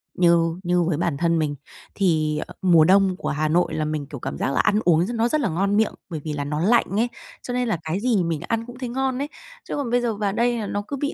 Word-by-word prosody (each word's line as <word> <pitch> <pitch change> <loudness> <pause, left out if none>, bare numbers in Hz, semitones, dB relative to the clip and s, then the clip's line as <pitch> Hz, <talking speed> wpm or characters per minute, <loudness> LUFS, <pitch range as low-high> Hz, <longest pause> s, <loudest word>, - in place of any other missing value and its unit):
như 170 -1 +3
như 175 0 +2
với 160 -3 0
bản 170 -4 -1
thân 170 0 +1
mình 145 -2 -1 0.4
thì, 155 -6 +1
ờ, - - -11
mùa 170 -4 +6
đông 190 0 +4
của - - -3
Hà 155 +2 0
Nội 175 +3 +1
là 155 -1 -1
mình, 150 -2 -3
kiểu, 140 -4 -8
cảm 135 - -5
giác - - -1
là - - 0
ăn 210 - +3
uống 170 0 +4
nó 230 +1 +2
rất 305 +3 0
là - - 0
ngon 195 +5 +1
miệng, 220 - +2 0.2
bởi 160 -3 -4
vì 155 -2 -3
là 145 -1 -3
nó 150 +1 -3
lạnh 225 +7 +4
ấy, 240 - +2 0.4
cho 245 - -4
nên 250 -1 0
là 210 - 0
cái 160 +5 -2
gì 220 -6 +2
mình 165 -2 -2
ăn 230 0 -1
cũng 245 0 -11
thấy 250 -2 -4
ngon 265 0 -1
ấy. 290 - -3 0.4
Chứ - - -2
còn 280 -5 -2
bây 245 0 +3
giờ 230 -3 -1
vào 200 -1 -1
đây 240 +1 +1
là 210 - -3
nó 205 0 -2
cứ 280 - -4
bị 285 +2 -2
180 Hz, 285 wpm, -23 LUFS, 160-230 Hz, 0.4 s, mùa